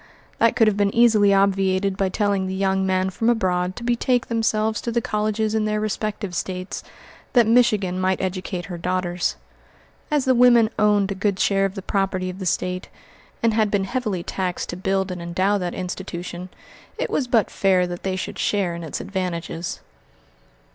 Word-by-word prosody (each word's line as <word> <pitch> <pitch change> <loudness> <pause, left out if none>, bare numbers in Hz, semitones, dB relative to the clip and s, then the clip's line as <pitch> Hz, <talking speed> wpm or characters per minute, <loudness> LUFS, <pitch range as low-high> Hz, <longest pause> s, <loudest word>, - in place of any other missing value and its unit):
That 230 0 +4
could 235 -3 +5
have 210 -1 +2
been 200 -1 +1
easily 220 -4 +5
obviated 195 0 +2
by 195 -1 0
telling 200 -1 0
the 190 - -3
young 190 0 +1
men 185 0 +1
from 225 +5 0
abroad 185 -5 +1
to 240 - -8
betake 240 +1 +1
themselves 220 -1 0
to 235 - -3
the 235 - +1
colleges 215 0 -1
in 220 -1 +1
their 215 0 0
respective 210 -2 -3
States, 185 +1 -4 0.5
that 240 -2 +6
Michigan 210 -6 +3
might 185 0 +1
educate 185 -1 -3
her 175 -3 -7
daughters. 180 0 -1 0.7
As 295 -3 +1
the 260 - +4
women 240 -2 +5
owned 205 -2 +3
a - - 0
good 195 0 -1
share 195 -1 +2
of 195 0 -3
the 195 - -6
property 190 -2 -1
of 185 - -11
the 190 - -3
State, 180 +1 -2 0.5
and 230 -1 +3
had 215 -1 +2
been 200 -1 +1
heavily 205 -4 -2
taxed 180 -1 -3
to - - -3
build 190 +1 -1
and 180 -1 -5
endow 185 +4 0
that 180 -2 -3
institution, 180 -1 -6 0.5
it - - -2
was 260 - 0
but 230 -3 +2
fair 185 -2 +2
that 175 0 -6
they 190 -1 -2
should 185 - -5
share 195 -4 0
in 170 0 -6
its 160 - -4
advantages. 175 -3 -4
195 Hz, 185 wpm, -22 LUFS, 185-215 Hz, 0.7 s, that